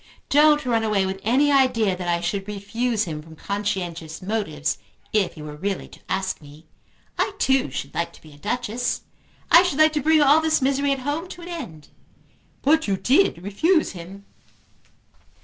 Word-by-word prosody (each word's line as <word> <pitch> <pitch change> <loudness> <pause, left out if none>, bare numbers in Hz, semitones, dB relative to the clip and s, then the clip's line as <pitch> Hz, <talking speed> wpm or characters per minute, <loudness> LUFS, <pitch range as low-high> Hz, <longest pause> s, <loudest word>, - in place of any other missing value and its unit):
Don't 295 0 +5
run 230 -2 +1
away 210 -3 +1
with 190 0 -3
any 265 +8 +3
idea 235 -8 +3
that 180 -1 -6
I 170 0 +1
should 195 +3 -2
refuse 215 +3 -1
him 155 -5 -5
from 160 +1 -14
conscientious 175 -5 -4
motives, 185 -7 -2 0.3
if 200 -5 +1
he 155 - -9
were 150 -1 -7
really 195 +5 -3
to - - -15
ask 190 -2 -2
me. 150 +2 -15 0.5
I 405 - +1
too 265 - +2
should 135 +1 -6
like 170 - -2
to - - -17
be 155 -2 -14
a - - -16
Duchess. 245 +4 -2 0.5
I 340 - +9
should 360 -6 -1
like 310 0 +5
to 300 - 0
bring 315 +2 +4
all 290 +3 +6
this 315 0 +2
misery 275 +1 +1
at 275 - 0
home 305 +5 -2
to 350 -1 -10
an 345 - -8
end." 175 - -8 0.7
"But 315 +1 +3
you 195 -1 +1
did 260 - +2
refuse 315 - +2
him." 190 +2 -10
210 Hz, 185 wpm, -23 LUFS, 175-285 Hz, 0.7 s, I